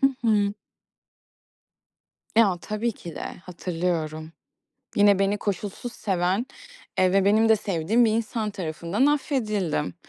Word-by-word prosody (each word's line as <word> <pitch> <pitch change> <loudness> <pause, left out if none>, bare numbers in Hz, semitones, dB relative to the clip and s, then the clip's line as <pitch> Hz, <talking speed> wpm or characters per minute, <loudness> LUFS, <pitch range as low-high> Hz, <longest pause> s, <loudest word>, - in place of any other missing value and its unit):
Hı 270 - +6 0.2
hı. 205 -2 +2 1.8
Ya, 200 -6 +5
tabii 215 +2 -2
ki 170 -5 -10
de - - -5 0.2
hatırlıyorum. 165 -3 -3 0.7
Yine 205 -1 +5
beni 195 +1 +1
koşulsuz 205 +4 -4
seven, 190 +4 0 0.5
eee, 185 0 +4
ve 195 0 +4
benim 220 +2 +4
de 220 - +6
sevdiğim 200 +5 +1
bir 220 - +3
insan 225 -1 -1
tarafından 175 - -1
affedildim 215 - 0
200 Hz, 120 wpm, -25 LUFS, 180-220 Hz, 1.8 s, Hı